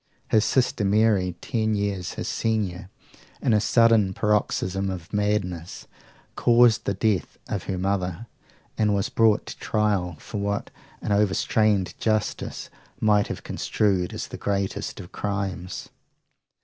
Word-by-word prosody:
His 110 -2 +4
sister 125 -4 +1
Mary, 100 -3 +2
ten 110 -2 0
years 100 -3 -2
his - - -5
senior, 100 -5 -1 0.5
in 115 - +2
a 105 - +4
sudden 110 -4 +4
paroxysm 100 -2 0
of 90 0 -7
madness, 100 -5 -1 0.5
caused 120 -1 +4
the 100 - 0
death 100 -1 0
of - - -3
her 95 - -2
mother, 95 +1 -1 0.5
and 105 -2 +3
was 100 - 0
brought 110 -2 +3
to - - -8
trial 100 -5 0
for 105 - -6
what 100 0 -2 0.3
an - - -3
overstrained 100 0 +2
justice 110 -1 -2 0.3
might 105 -1 +3
have - - -6
construed 95 -4 0
as - - -5
the - - -7
greatest 100 +1 -2
of 90 -3 -10
crimes. 95 -3 -4
100 Hz, 135 wpm, -25 LUFS, 95-110 Hz, 0.5 s, His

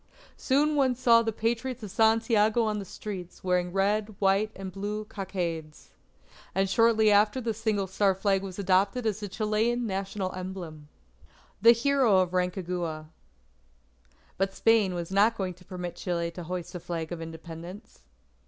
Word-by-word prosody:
Soon 295 +3 +1
one 265 -3 +2
saw 235 -2 +5
the 225 -1 -1
Patriots 235 +3 -2
of 205 - -6
Santiago 225 0 +3
on 215 -1 -1
the 200 - -6
streets, 185 -2 -8
wearing 180 -1 +1
red, 205 +2 0
white, 200 +2 +2
and 190 -1 -7
blue 210 +2 -4
cockades. 170 -7 -5 0.6
And 195 0 +2
shortly 220 +1 +4
after 210 +4 +4
this 225 -3 -3
the - - -13
Single 210 -3 0
Star 190 +1 +1
Flag 195 0 +1
was 190 -2 -7
adopted 200 +5 +1
as 215 -2 0
the 205 - -5
Chilean 220 +4 0
national 195 -1 -3
emblem. 180 -5 -7 0.7
THE 230 +2 +8
HERO 245 -3 +3
OF 185 -1 +1
RANCAGUA 175 -4 -2 1.3
But 195 0 0
Spain 215 -5 +3
was 170 0 -5
not 210 +4 +3
going 185 -2 -2
to 180 +1 -20
permit 180 -2 -6
Chile 170 -2 -2
to 175 0 -8
hoist 180 0 -5
a 180 - -5
Flag 165 -1 -5
of 170 -1 -5
Independence. 165 +4 -9
195 Hz, 160 wpm, -28 LUFS, 180-220 Hz, 1.3 s, THE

